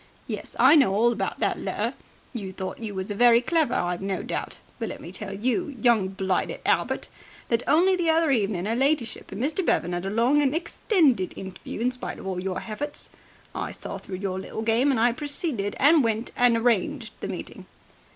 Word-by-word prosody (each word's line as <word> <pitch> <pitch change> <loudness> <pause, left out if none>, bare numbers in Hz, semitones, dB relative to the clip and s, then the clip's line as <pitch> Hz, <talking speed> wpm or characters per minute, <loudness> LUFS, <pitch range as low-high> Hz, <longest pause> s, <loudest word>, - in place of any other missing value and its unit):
Yes, - - -6
I - - +7
know 260 -11 +4
all 235 +3 +4
about - - -3
that - - +1
letter. - - -2 0.4
You 200 -6 -5
thought 190 0 -6
you 215 -3 -5
was 190 +2 -4
very 235 +3 +6
clever, 315 +4 +1
I've 175 0 -1
no 195 -1 -2
doubt. - - -4 0.2
But 225 - -3
let - - -7
me 170 - -9
tell 195 +1 -6
you, 255 - -1
young 220 -4 +3
blighted 190 -1 -1
Albert, - - +1 0.4
that 230 0 +2
only 360 +5 +4
the 345 -2 0
other 320 -2 +3
evening 200 -7 +1
'er 225 - 0
ladyship 265 -2 0
and 195 - -6
Mr. 305 +9 0
Bevan 175 - +1
'ad 175 +2 -3
a - - -1
long 240 +8 +3
and 280 0 +1
extended 320 - +1
interview 190 +2 -7
in 250 +2 +2
spite 250 - -6
of - - -10
all 190 -2 -2
your 185 -1 -3
hefforts. 285 +7 -5 0.4
I - - -3
saw - - -6
through 190 - -7
your 190 -1 -3
little 220 +3 -5
game, 230 +5 +3
and 260 -5 +2
I 240 +2 +4
proceeded 280 - -2
and 295 +1 +6
went 225 0 -1
and 245 -1 +4
arranged 230 -4 0
the - - -4
meeting." - - -7
230 Hz, 200 wpm, -25 LUFS, 195-280 Hz, 0.4 s, I